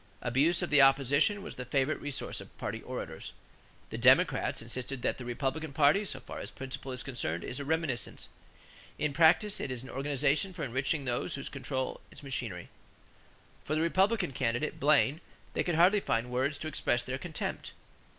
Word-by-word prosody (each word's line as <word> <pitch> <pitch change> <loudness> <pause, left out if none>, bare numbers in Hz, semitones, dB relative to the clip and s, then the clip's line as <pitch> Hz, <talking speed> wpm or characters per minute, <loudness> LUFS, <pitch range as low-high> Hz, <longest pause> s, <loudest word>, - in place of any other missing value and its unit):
Abuse 145 +9 +2
of 175 - -3
the 145 -1 +7
opposition 140 - +4
was - - -8
the 125 - -4
favorite 130 +1 0
resource 145 -2 -4
of - - -14
party - - -4
orators. - - -6 0.6
The - - -4
Democrats - - +4
insisted 125 +2 -4
that - - 0
"the 125 - -6
Republican 135 +5 -2
party 150 +8 +4
so 130 - -4
far 125 - -8
as - - -6
principle 135 0 -7
is 125 0 -4
concerned 85 - -3
is 125 - -5
a 140 - -4
reminiscence. 155 -5 -1 0.7
In 150 -2 -1
practice 170 +6 +4
it - - -3
is 130 -1 -4
an 130 - -9
organization 145 +6 0
for 170 -4 -5
enriching 135 +3 -1
those 120 -1 -1
who 140 - -6
control 130 -1 -3
its - - -13
machinery." 120 -10 -4 0.9
For 155 - -1
the 155 - +1
Republican 190 +1 +2
candidate, 125 +3 -1
Blaine, 145 +2 +3 0.3
they - - 0
could 175 - 0
hardly 180 +5 +6
find 125 -8 -1
words 130 +4 0
to 155 - -5
express 120 -5 0
their 130 +2 -4
contempt. 165 0 -5
140 Hz, 180 wpm, -31 LUFS, 130-160 Hz, 0.9 s, the